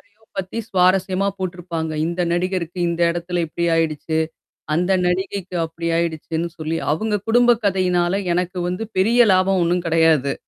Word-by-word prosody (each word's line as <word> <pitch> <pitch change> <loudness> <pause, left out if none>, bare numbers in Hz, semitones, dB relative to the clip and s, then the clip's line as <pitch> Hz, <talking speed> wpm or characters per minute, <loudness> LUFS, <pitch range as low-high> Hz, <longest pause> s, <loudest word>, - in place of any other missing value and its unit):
யாரையோ 220 0 -33 0.2
பத்தி 195 +4 -4
சுவாரஸ்யமா 190 +1 +2
போட்டுருப்பாங்க. 175 -3 -4
இந்த 170 +1 -3
நடிகருக்கு 180 0 -2
இந்த 170 0 -3
எடத்துல 175 +1 -2
இப்படி 170 +2 -3
ஆயிடுச்சு! 160 0 -1 0.6
அந்த 180 +3 +1
நடிகைக்கு 185 0 -2
அப்படி 165 +1 -7
ஆயிடுச்சுன்னு 165 0 -2
சொல்லி. 155 +1 -2 0.2
அவங்க 210 +6 0
குடும்ப 240 +1 +5
கதையினால 180 -2 +1 0.2
எனக்கு 180 +1 -1
வந்து 180 +4 -3 0.2
பெரிய 230 +5 +5
லாபம் 185 0 +2
ஒண்ணும் 175 +1 0
கெடையாது. 160 -4 +3
180 Hz, 135 wpm, -21 LUFS, 165-190 Hz, 0.6 s, குடும்ப